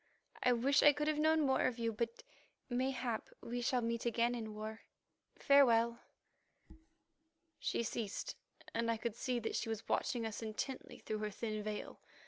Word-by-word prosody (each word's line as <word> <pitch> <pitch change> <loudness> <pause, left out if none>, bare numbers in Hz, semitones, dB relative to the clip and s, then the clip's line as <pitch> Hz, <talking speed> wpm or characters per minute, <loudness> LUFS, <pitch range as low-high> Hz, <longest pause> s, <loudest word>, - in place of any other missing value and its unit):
I 250 - +4
wish 275 +5 +4
I 295 - +8
could 295 +1 -1
have 305 -1 +1
known 315 +1 +4
more 265 -1 +3
of 250 - -2
you, 230 -1 0
but 230 +2 -3 0.5
mayhap 255 -2 -1
we 245 +1 -4
shall 250 +1 +2
meet 230 0 -1
again 235 0 +2
in 220 -3 -5
war. 215 +1 -6 0.6
Farewell." 235 -5 +5 1.6
She - - 0
ceased, 220 -3 -3 0.4
and 230 0 0
I 230 - +2
could 225 0 -3
see 250 +1 -1
that 225 - -2
she 225 - -1
was 225 -1 -4
watching 245 -5 0
us 220 0 -4
intently 225 +4 -4
through 215 -1 -4
her 215 0 -1
thin 215 +1 -3
veil. 210 0 -5
235 Hz, 165 wpm, -36 LUFS, 220-255 Hz, 1.6 s, I